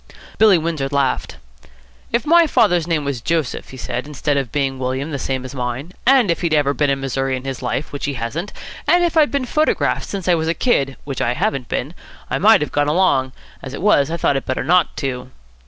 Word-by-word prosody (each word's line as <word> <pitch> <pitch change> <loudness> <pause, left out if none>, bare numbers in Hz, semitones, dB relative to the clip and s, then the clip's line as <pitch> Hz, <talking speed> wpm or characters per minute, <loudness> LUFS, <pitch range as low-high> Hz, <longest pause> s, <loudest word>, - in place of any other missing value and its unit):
Billy 215 -4 +6
Windsor 160 -4 -2
laughed. 140 - -1 0.7
"If 235 +4 0
my 335 +1 +5
father's 175 - +2
name 160 -4 0
was 140 -4 -3
Joseph," 160 -1 -2
he 130 - -10
said, 125 +2 -4
"instead 150 0 -1
of 135 -3 -2
being 135 -3 -1
William, 130 +4 -2
the 140 - -3
same 130 0 -3
as 130 - -8
mine, 130 +5 -4 0.2
and 255 -8 +5
if 170 - -2
he'd 165 -3 +1
ever 145 -2 +2
been 145 0 +1
in 135 0 0
Missouri 135 0 -1
in 130 - -8
his 135 -1 -5
life, 130 +4 -3
which 145 - -4
he 145 -1 -2
hasn't, 135 - -4 0.4
and 350 0 +4
if 345 -1 0
I'd 310 -2 +5
been 280 -2 -1
photographed 305 +5 0
since 195 -3 -5
I 180 - +5
was 160 -1 0
a 165 - 0
kid, 140 - +1
which 135 -3 -5
I 120 +1 0
haven't 130 -2 -1
been, 140 +7 -3 0.4
I - - 0
might 215 +1 +6
have 150 - -2
gone 145 0 +1
along. 145 -6 +2 0.3
As 135 0 -7
it - - -7
was, 155 -9 +4
I 170 - -2
thought 140 -4 +1
it 135 - -3
better 130 - -1
not 175 +3 +2
to." 130 -2 -4
145 Hz, 230 wpm, -19 LUFS, 135-175 Hz, 0.7 s, Billy